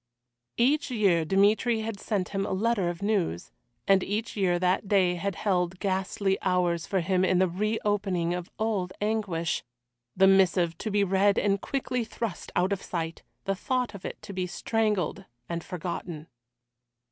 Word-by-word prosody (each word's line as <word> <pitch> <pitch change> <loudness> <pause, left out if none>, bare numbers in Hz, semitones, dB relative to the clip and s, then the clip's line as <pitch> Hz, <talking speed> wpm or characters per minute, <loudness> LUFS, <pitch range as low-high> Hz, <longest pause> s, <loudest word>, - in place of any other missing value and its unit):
Each 285 +7 +2
year 200 -9 +3
Dmitry 210 +5 +3
had 220 -2 -4
sent 200 -5 -1
him 195 -1 -1
a - - -2
letter 205 -2 +1
of 175 +2 -5
news, 190 - -1 0.4
and 195 -1 +5
each 210 +2 -3
year 185 -4 +2
that 185 +3 +1
day 190 -3 +3
had 190 +2 -3
held 180 -3 0
ghastly 195 0 0
hours 175 -3 +1
for 190 -2 +1
him 185 +1 +1
in 185 -1 +3
the 185 +1 +4
reopening 195 -2 0
of 180 0 -4
old 205 -5 -1
anguish 205 -6 -1 0.5
the 190 - +6
missive 185 -3 +4
to 220 - -3
be 205 -1 +2
read 195 +1 +3
and 200 0 +2
quickly 255 -3 -2
thrust 220 -4 -5
out 185 +3 +2
of 195 - -4
sight, 165 -2 -4 0.2
the 195 - 0
thought 250 +4 -1
of 200 - -10
it - - -6
to 200 - -8
be 185 -1 -2
strangled 205 -2 -1 0.2
and 170 -1 -4
forgotten. 170 -3 -5
195 Hz, 165 wpm, -27 LUFS, 180-210 Hz, 0.5 s, the